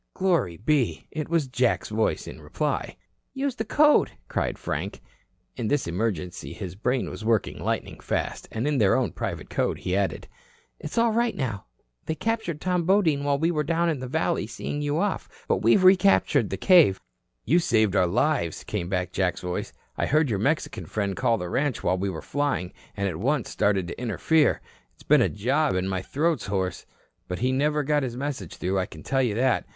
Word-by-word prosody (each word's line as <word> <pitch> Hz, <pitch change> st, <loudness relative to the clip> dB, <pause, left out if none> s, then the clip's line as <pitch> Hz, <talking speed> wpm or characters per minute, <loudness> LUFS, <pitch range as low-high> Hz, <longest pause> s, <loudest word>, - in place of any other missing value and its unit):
Glory 170 Hz, -, +1 dB
be! 120 Hz, -, 0 dB
It 155 Hz, -1 st, -4 dB
was 165 Hz, -3 st, +2 dB
Jack's 125 Hz, -2 st, 0 dB
voice 110 Hz, +1 st, 0 dB
in -, -, -9 dB
reply. -, -, -2 dB, 0.4 s
"Use 270 Hz, 0 st, -1 dB
the 220 Hz, -, -1 dB
code," 295 Hz, +7 st, +4 dB, 0.2 s
cried -, -, -2 dB
Frank. -, -, -4 dB, 0.6 s
In 120 Hz, -4 st, -3 dB
this 145 Hz, +4 st, +1 dB
emergency 90 Hz, -1 st, -3 dB
his 90 Hz, -, -6 dB
brain 125 Hz, +6 st, -1 dB
was -, -, -7 dB
working 110 Hz, -1 st, 0 dB
lightning -, -, -3 dB
fast. -, -, -3 dB
And 115 Hz, +5 st, -2 dB
in 145 Hz, -3 st, +1 dB
their 100 Hz, -3 st, +4 dB
own -, -, +1 dB
private -, -, -5 dB
code -, -, 0 dB
he 90 Hz, -, -2 dB
added: 100 Hz, -1 st, -1 dB, 0.5 s
"It's 150 Hz, -, -7 dB
all 230 Hz, 0 st, +4 dB
right 235 Hz, +1 st, +1 dB
now. 115 Hz, -8 st, -3 dB, 0.4 s
They 160 Hz, -, -1 dB
captured 220 Hz, -4 st, -2 dB
Tom 180 Hz, 0 st, 0 dB
Bodine 165 Hz, -6 st, +3 dB
while 145 Hz, -1 st, +2 dB
we 165 Hz, +4 st, +1 dB
were 150 Hz, -3 st, 0 dB
down 170 Hz, +3 st, +1 dB
in 155 Hz, -5 st, -1 dB
the 130 Hz, -, -5 dB
valley -, -, 0 dB
seeing 145 Hz, -, -4 dB
you 145 Hz, +1 st, 0 dB
off. 200 Hz, +3 st, -1 dB, 0.2 s
But -, -, +2 dB
we've 115 Hz, -, +4 dB
recaptured 185 Hz, -, +5 dB
the 95 Hz, -, -3 dB
cave." 165 Hz, -, +5 dB, 0.5 s
"You 170 Hz, -, +4 dB
saved 110 Hz, -, +2 dB
our 95 Hz, -2 st, +4 dB
lives," 110 Hz, -, 0 dB
came 90 Hz, -5 st, -3 dB
back 90 Hz, -1 st, -1 dB
Jack's 90 Hz, -2 st, 0 dB
voice. 90 Hz, 0 st, -4 dB, 0.3 s
"I -, -, +1 dB
heard 150 Hz, -3 st, +2 dB
your 100 Hz, -, 0 dB
Mexican 145 Hz, +9 st, -1 dB
friend 100 Hz, -3 st, -2 dB
call 120 Hz, -3 st, +2 dB
the 90 Hz, -, -4 dB
ranch 140 Hz, +7 st, -1 dB
while 90 Hz, +1 st, +1 dB
we 100 Hz, +1 st, -1 dB
were 80 Hz, -4 st, -6 dB
flying, 145 Hz, -11 st, -1 dB, 0.2 s
and 100 Hz, 0 st, 0 dB
at 85 Hz, -5 st, -3 dB
once 130 Hz, -, 0 dB
started 100 Hz, -3 st, +1 dB
to -, -, -7 dB
interfere. 150 Hz, +7 st, +2 dB, 0.3 s
It's -, -, -19 dB
been -, -, +5 dB
a -, -, +3 dB
job 135 Hz, +6 st, +1 dB
and 95 Hz, 0 st, 0 dB
my 95 Hz, -1 st, -1 dB
throat's 150 Hz, -, -1 dB
hoarse. 95 Hz, -2 st, -2 dB, 0.4 s
But 90 Hz, -, -3 dB
he 130 Hz, +2 st, +1 dB
never 150 Hz, +3 st, +1 dB
got 150 Hz, +1 st, +2 dB
his 125 Hz, -3 st, -4 dB
message 130 Hz, -, -4 dB
through, 95 Hz, +1 st, -1 dB
I 95 Hz, -, -1 dB
can 80 Hz, -, -12 dB
tell 135 Hz, 0 st, +1 dB
you 120 Hz, -5 st, 0 dB
that. 130 Hz, +3 st, +1 dB
130 Hz, 200 wpm, -26 LUFS, 100-155 Hz, 0.6 s, recaptured